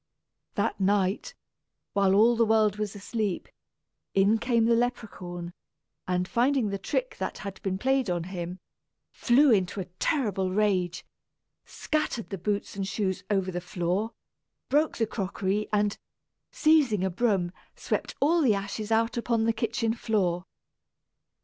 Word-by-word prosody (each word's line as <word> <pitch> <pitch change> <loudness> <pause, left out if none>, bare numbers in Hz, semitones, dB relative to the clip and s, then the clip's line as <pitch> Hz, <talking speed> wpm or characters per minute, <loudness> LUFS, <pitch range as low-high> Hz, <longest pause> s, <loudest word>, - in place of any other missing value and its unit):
That - - 0
night, 200 - +1 0.6
while 195 -1 +3
all 230 +4 +5
the 230 - +3
world 215 -2 +3
was 210 -1 -3
asleep, 205 -1 -3 0.7
in 200 +3 +4
came 235 -1 +2
the 235 - +4
Leperhaun 185 -8 -3 0.5
and, 180 0 0
finding 245 0 +2
the 200 0 -3
trick - - -2
that - - -3
had 195 -1 -6
been 190 -1 -1
played 265 0 +1
on 175 -1 -1
him, 180 0 -5 0.5
flew 270 +3 +4
into 195 -2 +2
a 185 - -3
terrible 205 - 0
rage, 185 -3 0 0.6
scattered 305 -8 -2
the 195 - -4
boots 205 +3 -2
and 195 -1 -2
shoes 195 -2 -2
over 195 -2 +1
the 175 0 -3
floor, 180 +5 -2 0.6
broke 300 +3 +2
the 225 - +2
crockery 200 0 -2
and, 205 -1 +1 0.5
seizing 290 - +3
a 190 - 0
broom, 190 -3 +1 0.2
swept - - -3
all 330 +4 +3
the 235 -8 +4
ashes 200 +2 -4
out 230 +2 +2
upon 235 -1 +1
the 230 0 +2
kitchen 225 0 -1
floor. 190 -6 0
210 Hz, 145 wpm, -27 LUFS, 190-230 Hz, 0.7 s, all